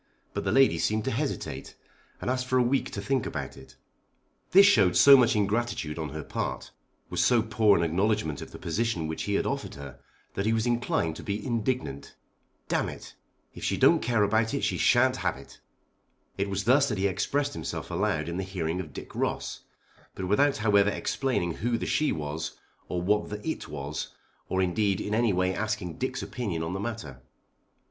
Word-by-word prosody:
But - - -3
the - - +1
lady 135 0 +4
seemed 110 0 0
to - - 0
hesitate, - - -4 0.4
and - - -6
asked 130 0 -1
for 130 - +2
a 125 - +4
week 130 +3 +1
to 100 - -5
think 130 +3 0
about - - -5
it. 65 -1 -15 0.7
This 195 +2 +8
showed 100 - +5
so 140 -1 +9
much 125 -4 +4
ingratitude 105 -6 -1
on 80 -1 -3
her 80 +2 -6
part, - - -4 0.4
was - - +1
so 120 -3 +4
poor 110 -2 +3
an 85 - +1
acknowledgment 85 -3 0
of - - -8
the - - -10
position 115 -7 -1
which 80 0 -4
he 100 - 0
had - - +1
offered - - -3
her, 70 -2 -10 0.3
that 100 - -1
he 110 - +3
was 110 0 +1
inclined 120 -9 0
to - - -9
be 100 +1 -3
indignant. 115 - -2 0.5
"D - - +1
it; - - -5 0.4
if - - -10
she - - 0
don't - - +5
care 115 -3 +2
about 110 +5 +1
it 140 - -2
she - - +1
sha'n't 130 +1 +4
have 90 - -1
it." 70 - -14 0.8
It 100 +1 -2
was 100 0 -2
thus 135 +5 +4
that 105 - -2
he 95 - 0
expressed 140 +9 0
himself - - -5
aloud 75 0 0
in 85 +1 -3
the 95 - -2
hearing 90 -2 -3
of 80 -6 -6
Dick - - -9
Ross; - - -2 0.6
but 95 - -4
without 140 +9 +3
however 105 -2 +4
explaining 105 -5 -1
who 120 +1 0
the - - -4
she 150 - +1
was, 75 +1 -4 0.4
or 90 -1 -2
what 105 +3 +1
the 105 +5 -6
it 160 - -3
was, 75 +1 -5 0.4
or 95 0 +1
indeed 95 +2 +1
in 105 - -3
any 115 0 +3
way 90 0 +1
asking 105 -5 -3
Dick's 130 +1 -2
opinion 100 -10 -3
on 80 +2 -3
the 95 - -3
matter. 100 - -5
105 Hz, 200 wpm, -28 LUFS, 85-120 Hz, 0.8 s, so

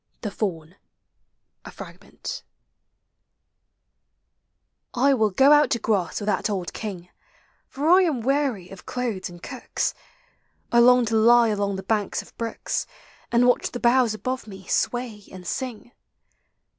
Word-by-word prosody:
THE 210 - -4
FAUN. 180 -4 -4 0.9
A - - -9
FRAGMENT. - - -9 2.5
I 275 +3 +4
will 220 -5 +2
go 265 +9 +5
out 295 0 +6
to 235 - +1
grass 200 -6 0
with 205 - -5
that 210 +1 0
old 190 -4 -3
King, 185 -5 -6 0.6
For 285 +3 -3
I 365 +3 +7
am 310 -10 0
weary 260 -7 0
of 195 -1 -13
clothes 235 -8 -3
and 175 -1 -13
cooks. 255 -3 -3 0.8
I 235 - +5
long 250 0 +6
to 225 0 -1
lie 235 +1 +6
along 200 -1 -1
the 190 - -6
banks 205 0 -1
of - - -20
brooks, 230 -1 -3 0.4
And 240 +1 +4
watch 245 - +2
the 245 - -6
boughs 240 -2 +3
above 255 +2 -4
me 190 -2 -11
sway 240 -4 -1
and 185 -1 -11
swing. 240 +2 -5
225 Hz, 145 wpm, -24 LUFS, 200-250 Hz, 2.5 s, I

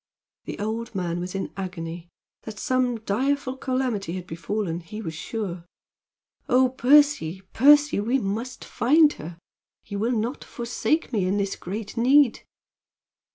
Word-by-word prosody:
The - - -6
old 225 +2 -4
man 175 -2 -2
was 180 +2 -5
in 195 - -4
agony. 170 -3 -6 0.3
That 215 -2 -8
some 250 0 0
direful 260 +5 0
calamity 255 -9 -2
had 180 -1 -5
befallen 175 +1 -3
he 180 +5 -9
was 165 -7 -5
sure. 185 -1 -5 0.9
"Oh, 255 +1 +5
Percy! 260 - +3
Percy! 290 0 +6
We 235 +6 +1
must 225 +3 -4
find 300 +5 +4
her! 165 +2 -8 0.5
You 200 - -5
will 230 +3 +1
not 235 +6 -3
forsake 250 +5 -2
me 195 -5 +1
in 195 +2 +1
this 200 -1 -1
great 205 +5 -6
need?" 260 +1 +5
220 Hz, 140 wpm, -25 LUFS, 185-255 Hz, 0.9 s, Percy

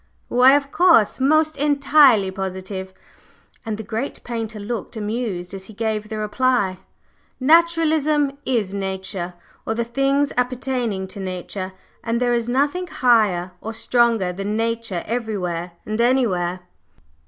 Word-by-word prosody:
"Why, 250 +2 +6
of 280 -1 -1
course! 330 - +4
Most 310 +3 +3
entirely 280 -7 +4
positive!" 190 0 -5 0.8
And 215 -2 -2
the 220 - -6
great 225 +5 -4
painter 225 -2 -5
looked 220 +1 -5
amused 210 -4 -3
as 190 -1 -7
he 220 - -11
gave 215 -1 -2
the 220 - -4
reply. 210 -3 0 0.6
"Naturalism 310 -1 +3
is 220 -8 -1
Nature, 190 -2 -4 0.3
or 225 - -2
the 235 - 0
things 275 +4 +1
appertaining 250 -5 -1
to 200 - -8
Nature, 185 0 -5 0.3
and 230 0 -1
there 245 -1 +1
is 235 0 -1
nothing 290 +8 0
higher 220 - +2
or 225 - -5
stronger 230 -4 +1
than 200 +3 -3
Nature 230 -5 -2
everywhere 185 -7 -3
and 215 +2 -1
anywhere." 190 -8 +1
225 Hz, 130 wpm, -21 LUFS, 195-260 Hz, 0.8 s, Why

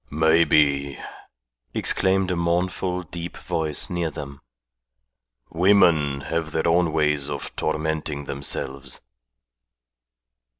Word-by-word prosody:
"Maybe!" 75 -3 +3 0.8
exclaimed 95 0 +2
a - - 0
mournful 90 +2 -1
deep 85 +1 -7
voice 80 -3 -2
near 85 -2 -2
them. 70 -2 -9 1.1
"Women 80 -6 +3
have 80 +1 -3
their 80 +1 0
own 85 0 +3
ways 75 -2 +1
of 70 - -6
tormenting 80 -1 -2
themselves." 70 -1 -5
80 Hz, 90 wpm, -23 LUFS, 70-85 Hz, 1.1 s, Maybe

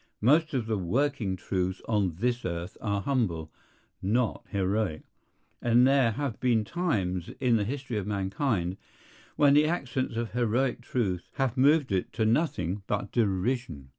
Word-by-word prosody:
Most 150 +6 +3
of 120 -4 0
the 110 -2 -1
working 115 +1 0
truths 95 0 -2
on 100 -7 +1
this 120 +6 -1
earth 85 0 -4
are 100 -2 -1
humble, 90 - -1 0.5
not 115 +5 0
heroic; 95 -4 -1 0.6
and 120 +1 +5
there 135 -4 +4
have 140 -1 -3
been 115 -4 +2
times 100 - -1
in 125 -3 +3
the 105 - 0
history 130 -1 -3
of 100 - -5
mankind 100 - -1 0.6
when 145 -1 +5
the 150 +1 +5
accents 130 -7 -2
of 115 0 -2
heroic 120 +2 0
truth 100 -8 -2
have 135 -3 0
moved 140 0 +4
it 95 -2 -1
to 110 -1 0
nothing 105 - 0
but 105 0 -2
derision. 100 - -1
115 Hz, 150 wpm, -28 LUFS, 95-130 Hz, 0.6 s, and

